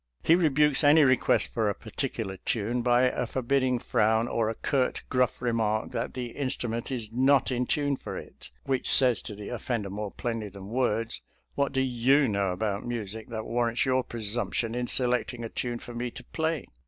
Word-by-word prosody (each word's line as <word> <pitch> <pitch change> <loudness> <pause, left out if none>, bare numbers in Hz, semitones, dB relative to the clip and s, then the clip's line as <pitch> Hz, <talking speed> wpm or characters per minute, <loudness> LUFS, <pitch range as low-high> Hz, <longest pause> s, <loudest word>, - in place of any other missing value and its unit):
He 165 - +5
rebukes 150 -4 +3
any 150 +2 +7
request 130 -3 +2
for 110 -3 +1
a 100 - -2
particular 110 -4 -4
tune 115 +5 -1
by 120 +1 +3
a 125 -1 +1
forbidding 130 +1 +1
frown 110 0 +2
or 115 -2 0
a 115 - -3
curt, 130 +1 0
gruff 125 -1 +1
remark 110 -2 0
that 115 - -3
the 125 -2 -4
instru 135 -3 -3
ment 115 0 -3
is 115 -4 -4
not 135 +2 +3
in 125 0 0
tune 145 -2 +1
for - - -6
it, - - -11
which 135 -2 -1
says 125 -3 +4
to 105 - -7
the 105 0 -8
of 120 - -5
fender 110 -6 -2
more 105 +1 -4
plainly 115 -1 -4
than 100 0 -10
words, 115 -2 0 0.2
" - - -43
What 140 -1 0
do 135 - +1
you 130 +2 +3
know 100 -3 0
about 100 +2 -2
music 110 -2 -4
that 110 -2 -5
warrants 120 0 0
your 130 -1 +2
presump 115 0 -2
tion 115 -1 0
in 125 0 -2
selecting 125 -1 0
a 115 - -4
tune 120 +1 -3
for 120 - -10
me 120 +1 -3
to - - -10
play? 160 -2 -2
120 Hz, 205 wpm, -28 LUFS, 110-130 Hz, 0.2 s, any